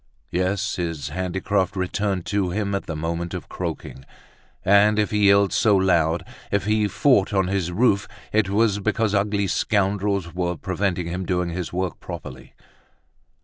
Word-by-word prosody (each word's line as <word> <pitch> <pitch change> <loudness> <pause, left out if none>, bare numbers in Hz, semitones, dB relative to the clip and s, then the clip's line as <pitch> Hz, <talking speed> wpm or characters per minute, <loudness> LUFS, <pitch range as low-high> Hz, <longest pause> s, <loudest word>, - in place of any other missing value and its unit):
Yes, 95 +2 -1
his 80 -5 -3
handicraft 95 +3 -1
returned 95 0 -1
to 100 -3 0
him 100 +2 -2
at 100 - -3
the 80 - -4
moment 85 +2 -3
of - - -7
croaking; 65 - -6 0.6
and 100 +2 +5
if 105 -1 +1
he 105 -1 +3
yelled 100 0 +4
so 105 -3 +4
loud, 85 -3 +2 0.3
if 100 -1 0
he 105 0 +2
fought 105 -4 +2
on 95 -1 +2
his 95 -3 -1
roof, 100 0 +2 0.3
it 105 -2 +2
was 105 0 +2
because 105 +1 0
ugly 100 0 +1
scoundrels 100 -2 0
were 90 -1 -2
preventing 95 -1 -1
him 90 +3 -3
doing 90 -1 -1
his 90 0 -4
work 90 -1 -3
properly. 65 -1 -9
95 Hz, 155 wpm, -23 LUFS, 90-100 Hz, 0.6 s, and